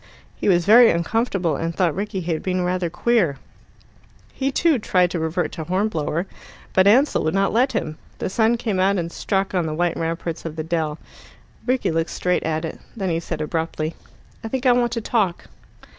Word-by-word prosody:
He -, -, -1 dB
was 175 Hz, -2 st, +3 dB
very 230 Hz, +3 st, +8 dB
uncomfortable, 180 Hz, -, 0 dB
and 165 Hz, 0 st, -3 dB
thought 175 Hz, -5 st, +2 dB
Rickie 200 Hz, 0 st, -3 dB
had 165 Hz, -2 st, -2 dB
been 185 Hz, -1 st, -1 dB
rather 180 Hz, -1 st, -1 dB
queer. 175 Hz, -, +1 dB, 1.0 s
He 270 Hz, 0 st, -1 dB
too 310 Hz, -1 st, +2 dB
tried 180 Hz, -4 st, +2 dB
to 175 Hz, -, -2 dB
revert 160 Hz, +3 st, -1 dB
to 160 Hz, -, -5 dB
Hornblower, 175 Hz, -2 st, -1 dB, 0.5 s
but 190 Hz, +1 st, +5 dB
Ansell 260 Hz, +8 st, +4 dB
would 155 Hz, +3 st, 0 dB
not 195 Hz, 0 st, +2 dB
let 250 Hz, +4 st, +2 dB
him. 155 Hz, -8 st, -3 dB, 0.2 s
The -, -, -3 dB
sun 225 Hz, +4 st, +2 dB
came 215 Hz, -5 st, -2 dB
out, 195 Hz, +2 st, +3 dB
and 170 Hz, -1 st, -3 dB
struck 195 Hz, +1 st, -1 dB
on 175 Hz, -3 st, +1 dB
the 155 Hz, -, -3 dB
white 175 Hz, +1 st, 0 dB
ramparts 165 Hz, 0 st, -3 dB
of 165 Hz, -2 st, -6 dB
the 160 Hz, -, -3 dB
dell. 160 Hz, -2 st, -2 dB, 0.7 s
Rickie 255 Hz, -7 st, +1 dB
looked 165 Hz, +1 st, 0 dB
straight 180 Hz, 0 st, 0 dB
at 160 Hz, 0 st, -2 dB
it. 160 Hz, -, -6 dB, 0.2 s
Then 190 Hz, -4 st, -1 dB
he 165 Hz, -, 0 dB
said 160 Hz, -2 st, -5 dB
abruptly 160 Hz, 0 st, -2 dB, 0.5 s
"I -, -, -3 dB
think 260 Hz, +3 st, -3 dB
I 255 Hz, -, +6 dB
want 240 Hz, -1 st, +2 dB
to 230 Hz, -, -2 dB
talk." 210 Hz, -6 st, -1 dB
180 Hz, 195 wpm, -22 LUFS, 165-220 Hz, 1.0 s, very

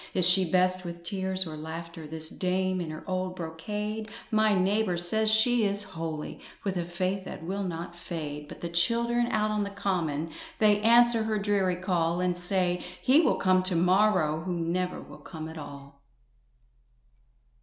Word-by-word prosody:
Is 180 Hz, -1 st, +5 dB
she 185 Hz, -1 st, +5 dB
best 185 Hz, +1 st, +2 dB
with 170 Hz, -1 st, -7 dB
tears 190 Hz, +1 st, 0 dB
or 160 Hz, -2 st, -6 dB
laughter, 160 Hz, +1 st, -7 dB
This 160 Hz, +1 st, -4 dB
dame 185 Hz, 0 st, 0 dB
in 165 Hz, -, -4 dB
her 155 Hz, 0 st, -7 dB
old 185 Hz, -1 st, -2 dB
brocade? 210 Hz, +6 st, -4 dB, 0.2 s
My 215 Hz, -1 st, +3 dB
neighbour 190 Hz, 0 st, +1 dB
says 215 Hz, +6 st, +2 dB
she 220 Hz, +2 st, +4 dB
is 200 Hz, 0 st, +1 dB
holy, 160 Hz, -2 st, -5 dB, 0.2 s
With 195 Hz, -2 st, -2 dB
a 175 Hz, -1 st, -1 dB
faith 185 Hz, +2 st, -2 dB
that -, -, -8 dB
will 195 Hz, +4 st, -3 dB
not 170 Hz, -2 st, -5 dB
fade. 150 Hz, -4 st, -6 dB
But -, -, -11 dB
the 170 Hz, -, -3 dB
children 235 Hz, +7 st, +2 dB
out 215 Hz, -2 st, 0 dB
on 210 Hz, -1 st, 0 dB
the 200 Hz, -, -3 dB
common 165 Hz, -6 st, -2 dB, 0.3 s
They 210 Hz, -1 st, +4 dB
answer 235 Hz, 0 st, +5 dB
her 220 Hz, -1 st, 0 dB
dreary 200 Hz, -3 st, +1 dB
call, 175 Hz, -2 st, 0 dB
And 180 Hz, -1 st, +1 dB
say: 180 Hz, 0 st, 0 dB, 0.2 s
"He 270 Hz, +5 st, +5 dB
will -, -, +3 dB
come 185 Hz, -1 st, +3 dB
to 185 Hz, -1 st, -1 dB
morrow!" 180 Hz, -3 st, +3 dB
Who 175 Hz, 0 st, -3 dB
never 180 Hz, +2 st, -1 dB
will -, -, -12 dB
come 160 Hz, -2 st, -8 dB
at 160 Hz, 0 st, -8 dB
all. 140 Hz, -1 st, -11 dB
185 Hz, 175 wpm, -28 LUFS, 170-205 Hz, 0.3 s, Is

